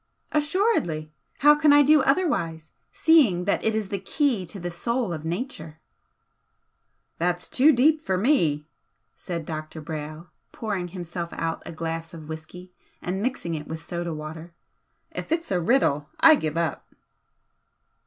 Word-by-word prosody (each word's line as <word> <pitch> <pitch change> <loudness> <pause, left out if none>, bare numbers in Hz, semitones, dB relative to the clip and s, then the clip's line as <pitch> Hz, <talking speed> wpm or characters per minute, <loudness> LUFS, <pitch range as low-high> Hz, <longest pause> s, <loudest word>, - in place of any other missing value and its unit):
"Assuredly! 295 - +1 0.3
How 295 +1 +8
can 300 0 +4
I 290 0 +7
do 300 +1 +6
otherwise, 265 - 0 0.2
seeing 255 - +4
that 200 - 0
it 220 0 +1
is 215 -3 -2
the 200 - -2
Key 225 - 0
to 195 - -6
the 175 0 -4
Soul 235 +3 -1
of 155 -2 -6
Nature?" 165 - -5 1.4
"That's 175 +1 -1
too 285 +5 +5
deep 300 +4 +3
for 190 -11 -1
me!" 170 - +2 0.5
said 170 -3 -5
Dr. 155 0 -6
Brayle, 155 +2 -7 0.2
pouring 200 -5 -3
himself 175 -1 -6
out 165 0 -3
a - - -5
glass 165 +1 -5
of 155 -2 -10
whisky 160 +3 -9 0.3
and 190 +2 -3
mixing 240 -8 -2
it 150 -1 -5
with 160 0 -7
soda 175 -1 -3
water 160 +2 -8 0.6
"If - - -6
it's 330 -5 -1
a 180 -2 +1
riddle 165 - +2
I 325 -1 +9
give 160 - -1
it - - +3
up!" 160 -4 -2
175 Hz, 155 wpm, -25 LUFS, 160-260 Hz, 1.4 s, I